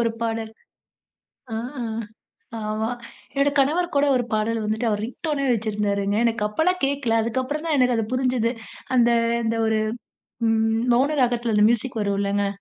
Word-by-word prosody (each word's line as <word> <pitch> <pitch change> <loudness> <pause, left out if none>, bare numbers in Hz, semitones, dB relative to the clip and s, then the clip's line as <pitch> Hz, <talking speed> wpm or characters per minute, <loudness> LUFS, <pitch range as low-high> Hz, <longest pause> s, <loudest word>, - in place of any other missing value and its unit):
ஒரு 230 -1 +2
பாடல் 225 -1 -2 1.0
ஆ, - - -1 1.0
ஆமா. 215 +1 -2 0.4
என்னோட 280 +1 +3
கணவர் 320 +6 +2
கூட 285 +1 +4
ஒரு 245 - +1
பாடல் 220 +1 0
வந்துட்டு 220 +2 0
அவர் 210 0 -1
ரிங்டோன்னே 285 +2 -3
வச்சிருந்தாருங்க. 205 -2 -1
எனக்கு 230 -2 +1
அப்பல்லாம் 360 +11 +1
கேட்கல. 275 -5 0
அதுக்கு 235 +3 -1
அப்புறம் 300 +4 -4
தான் 310 -3 +1
எனக்கு 250 -2 +3
அது 225 - 0
புரிஞ்சது. 250 -2 +1 0.4
அந்த, 240 -1 +5 0.3
அந்த 225 0 0
ஒரு 220 0 +2 0.7
ம், 225 0 +2
மௌன 280 +5 +2
ராகத்தில 240 -2 +1
அந்த 210 0 +5
மியூசிக் 240 0 -2
வரும் 200 -1 0
இல்லங்க? 200 0 0
230 Hz, 150 wpm, -23 LUFS, 215-260 Hz, 1.0 s, அந்த